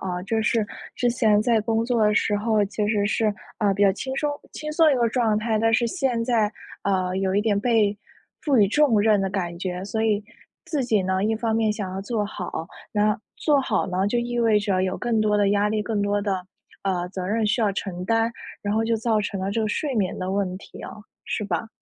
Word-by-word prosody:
啊， 180 -1 -3
就 220 +4 -1
是 225 -1 +2 0.3
之 245 -1 +1
前 220 -4 +3
在 230 -2 +3
工 225 +1 0
作 235 -3 +2
的 210 - +2
时 205 -1 +2
候 215 -1 +2
其 205 +1 -2
实 205 -1 +1
是， 215 0 +1 0.3
呃， 205 -3 +2
比 205 - +1
较 195 - +6
轻 265 +6 -5
松 295 +1 0 0.2
轻 305 0 -5
松 320 +1 +4
的 300 - +6
一 - - +2
个 235 -1 +2
状 225 -3 +1
态， 220 0 0
但 225 +1 +3
是 240 - +3
现 255 -8 -1
在， 225 -3 +1 0.3
呃， 185 -2 0
有 190 0 0
一 205 - +3
点 210 -2 +1
被 210 -3 +2 0.5
赋 285 -4 +2
予 200 -3 +5
重 265 -4 +3
任 210 -1 +4
的 195 - 0
感 175 -3 -3
觉， 180 0 -4
所 220 +2 -2
以 210 -1 +1 0.4
自 285 -5 -1
己 215 -5 +2
呢， 190 +1 0
一 220 +1 +1
方 225 0 -1
面 220 -1 +2
想 200 -3 -5
要 190 - -4
做 210 +1 -2
好， 180 -5 -5 0.2
然 210 0 +1 0.2
做 290 -3 +2
好 260 - 0
呢， 185 +2 0
就 225 - 0
意 240 0 -3
味 225 -2 +4
着 195 -3 0
有 185 0 -2
更 235 -3 0
多 210 -1 +2
的 205 -1 +3
压 205 +1 +2
力、 215 0 0
更 215 -1 -1
多 205 0 0
的， 190 -3 -2 0.4
呃， 180 -2 -1
责 185 -1 -5
任 220 +2 0
需 215 +3 +1
要 210 -2 +2
承 180 -2 -4
担， 225 +2 +2 0.3
然 205 - -1
后 220 +1 +1
就 230 0 +1
造 220 -1 +1
成 200 -2 -3
了 190 - -2
这 225 +3 -1
个 220 - 0
睡 270 +3 -2
眠 190 -3 0
的 185 0 -3
问 190 -2 -1
题 - - -12
哦， 210 - -9 0.2
是 - - -3
吧？ 195 +2 -2
210 Hz, 260 characters per minute, -24 LUFS, 195-230 Hz, 0.5 s, 较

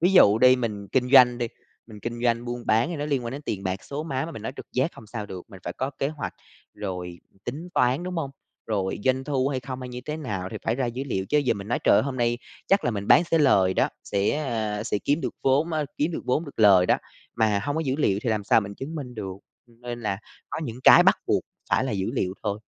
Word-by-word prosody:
Ví 180 +3 +3
dụ 110 - +7
đi 130 +1 +7
mình 105 -5 -4
kinh 125 +1 +1
doanh 125 -3 +7
đi, 120 -2 -1 0.4
mình 105 -2 -12
kinh 120 +1 -5
doanh 120 0 +2
buôn 120 -1 -5
bán 110 +6 +3
thì 170 - -3
nó 145 - -3
liên 140 -5 -1
quan 115 - -4
đến 140 +2 -6
tiền 100 -8 -4
bạc, 95 0 -3
số 145 +2 -4
má 135 -2 -2
mà 165 - -7
mình 110 - -8
nói 125 - -4
trực - - -8
giác 130 +7 0
hông 110 - -13
sao 105 -1 -6
được. 95 +1 -9
Mình 95 -3 -12
phải 90 - -3
có 130 +8 -3
kế 135 - +1
hoạch, 150 -1 -5 0.4
rồi 90 -2 -5 0.3
tính 155 +8 -5
toán, 125 +6 +2
đúng 180 0 -4
hông? 145 -5 -2 0.4
Rồi 100 -4 -1
doanh 130 0 +2
thu 135 -2 0
hay 135 -2 -2
không, 130 0 -6
hay 125 - -6
như 125 0 -6
thế 150 - -3
nào 105 -12 -4
thì 110 - -5
phải 115 - 0
ra 130 -2 0
dữ 125 +3 -4
liệu, 95 -6 -2
chứ 150 - +2
giờ 130 -5 +2
mình 100 0 -8
nói: 120 - +1
"Trời - - +6
ơi, - - +4
hôm 135 -2 -3
nay 120 -1 +1 0.3
chắc 195 +1 +3
là 120 - +2
mình 100 -2 -4
bán 170 - +7
sẽ 165 - +1
lời 95 -11 +4
đó, - - +3 0.2
sẽ, 100 0 +1 0.2
à, 110 -3 -2
sẽ - - 0
kiếm 145 +3 +2
được - - -3
vốn 145 +5 +2
á, 155 -1 0
kiếm 155 +4 +1
được - - -4
vốn 135 +6 +1
được 140 - -12
lời 95 -4 +7
đó" - - +4 0.4
mà 110 -3 +2
hông 145 +1 -1
có 160 - +1
dữ 135 +1 0
liệu 100 -10 +2
thì 120 - 0
làm 105 -2 -1
sao 110 - +5
mình 100 -1 -6
chứng 140 +8 -6
minh 135 -6 -6
được, 95 -4 -5 0.3
ừm, 120 0 -24
nên 120 -1 -5
là 100 -3 -2 0.3
có - - -3
những 120 -1 -6
cái - - +9
bắt - - +4
buộc - - +2 0.3
phải - - +3
là 130 - -2
dữ 100 +1 -1
liệu 95 -7 -1
thôi. 105 -2 0
120 Hz, 280 wpm, -25 LUFS, 105-140 Hz, 0.4 s, cái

